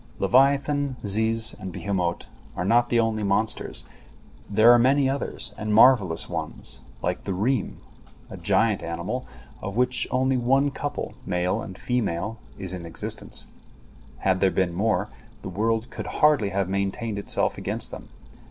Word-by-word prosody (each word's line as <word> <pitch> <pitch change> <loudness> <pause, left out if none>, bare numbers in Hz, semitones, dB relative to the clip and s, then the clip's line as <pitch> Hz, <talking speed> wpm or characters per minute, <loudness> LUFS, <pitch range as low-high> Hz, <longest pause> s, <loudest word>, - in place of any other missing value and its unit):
Leviathan, 140 +1 +3
ziz, 110 +2 +2
and 95 -3 -6
behemot 90 -3 -2 0.3
are 90 - -2
not 120 +4 +3
the 120 - +3
only 110 -1 +1
monsters; 100 +2 -1 0.6
there 110 +3 +6
are 120 - +7
many 135 +3 +4
others, 135 -5 -3
and 105 0 0
marvellous 105 -9 +5
ones, - - -4 0.2
like - - -1
the 95 - -3
reem, 110 +3 0 0.5
a - - -6
giant 110 -4 +1
animal, 85 +10 -4 0.3
of 100 +2 -5
which 125 0 +2
only 130 +1 +1
one 135 +4 +2
couple, 145 +1 -4
male 90 +3 0
and 95 -3 -8
female, 110 -3 -2 0.2
is 95 -1 -5
in 90 -2 -6
existence. 85 -1 -5 0.7
Had 95 +6 +1
there 95 - +4
been 95 -2 0
more, 100 +1 +1 0.4
the - - -5
world 110 +4 -1
could - - -6
hardly 150 -9 +3
have 100 -1 -1
maintained 100 +3 -2
itself - - -1
against - - -2
them. - - -9
110 Hz, 150 wpm, -25 LUFS, 95-125 Hz, 0.7 s, are